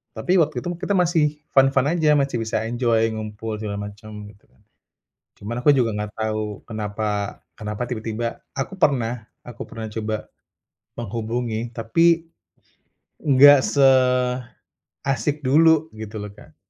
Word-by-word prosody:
tapi 185 - 0
waktu 155 -1 +1
itu - - -5
mah 175 - -7
kita 200 - 0
masih 175 -3 +3 0.3
fun-fun 135 0 +4
aja, 160 -3 +2
masih 140 -3 +1
bisa 110 - -1
enjoy 115 -2 +1
ngumpul 110 0 -5
segala 105 -2 -4
macam, 105 0 -11
gitu 100 -1 -20
kan. 65 - -30 0.7
Cuman 110 +4 -6
aku 145 - +3
juga 120 -4 +2
gak 105 0 -5
tahu 110 -2 -3
kenapa 105 -2 -3 0.2
kenapa 105 +2 -4
tiba-tiba 115 0 -4 0.2
aku 180 +8 -4
pernah 120 -7 +1 0.2
aku 120 -1 -10
pernah 110 -1 -7
coba 110 -1 -4 0.7
menghubungi, 115 +1 -3
tapi 165 +9 +3 1.0
nggak 145 -1 +7
seasik 125 -2 +2 0.9
dulu, 160 +3 +4
gitu 110 0 -8
loh 105 -1 -7
Kak. - - -17
115 Hz, 135 wpm, -22 LUFS, 110-135 Hz, 1.0 s, nggak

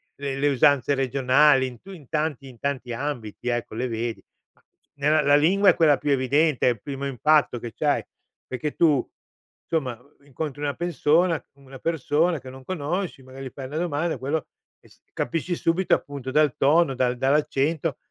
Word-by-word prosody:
le 140 -1 -4
le 145 +1 +3
usanze 140 +1 +3
regionali, 135 +1 +3
in 125 -2 -10
tu 195 - -13
in 155 -9 -12
tanti 150 -3 -2
in 125 -2 -13
tanti 130 -2 -3
ambiti, 125 -4 -5
ecco, 120 -2 -3
le 125 +3 -1
vedi, 115 -1 -4 0.3
ma - - -33 0.3
nella 150 +2 +2
la 145 0 +4
lingua 190 +7 +4
è 180 - +5
quella 150 -4 +4
più 145 - -3
evidente, 140 +2 +2
è - - +5
il 115 -4 -6
primo 140 +1 -5
impatto 140 0 +2
che 115 -1 -7
c’hai, - - 0 0.4
perché 145 +4 -4
tu, 150 -6 +3 0.6
somma, 135 -8 -1 0.3
incontri 145 +1 -6
una 145 -1 -1
pessona 170 0 +1
una 135 -1 -13
persona 165 +2 0
che 130 - -11
non 130 0 -12
conosci, 175 +1 -3
magari 130 +1 -10
gli - - -10
fai 135 - -7
una 145 +4 -5
domanda, 165 -1 -1
quello 140 +3 -2 0.7
capisci 165 +7 -2
subito 170 +3 +2
appunto 140 -2 -7
dal 150 -1 +3
tono, 150 +1 +3
dal 125 -1 0
dall’accento, 145 +3 0
140 Hz, 170 wpm, -24 LUFS, 130-155 Hz, 0.7 s, è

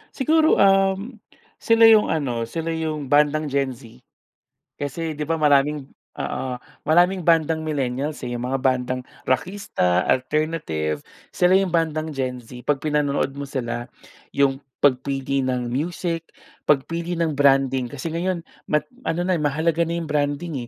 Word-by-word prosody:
Siguro, 315 +3 +3
uhm, 195 +4 +2 0.4
sila 230 0 +4
'yong 215 -1 +5
ano, 125 -7 -1
sila 165 +6 -3
'yong 155 -4 -3
bandang 150 0 +3
Gen 135 -2 0
Z. 120 -1 -15 0.8
Kasi, 155 +3 -4
'di 150 - -3
ba, 165 +2 -1
maraming 145 -1 +3 0.3
oo. 130 - -3 0.3
Maraming 175 +3 +3
bandang 160 -1 +2
millennials, 145 -1 -2
eh, 120 - -3
yung 120 - -4
mga 135 - 0
bandang 130 -1 0 0.2
rakista, 130 - 0
alternative, 130 - -1 0.3
sila 180 +1 +3
'yong 190 -2 +2
bandang 160 -2 0
Gen 130 -3 -3
Z. 125 +1 -12
Pag 145 -2 +1
pinanonood 145 -2 0
mo 140 +1 -7
sila 120 -3 -4 0.5
'yong 135 -1 +2 0.2
pagpili 135 0 +1
ng 125 -2 -1
music, 165 +4 -2 0.4
pagpili 165 +5 0
ng 165 -1 0
branding. 135 -3 +3
Kasi 145 +6 -6
ngayon 170 +1 -2 0.2
mat 150 0 +1 0.2
ano 170 +2 0
na 180 -2 +1
mahalaga 160 +3 +1
na 170 - -2
'yong 165 -2 -4
branding, 145 -2 -1
150 Hz, 140 wpm, -23 LUFS, 130-165 Hz, 0.8 s, yong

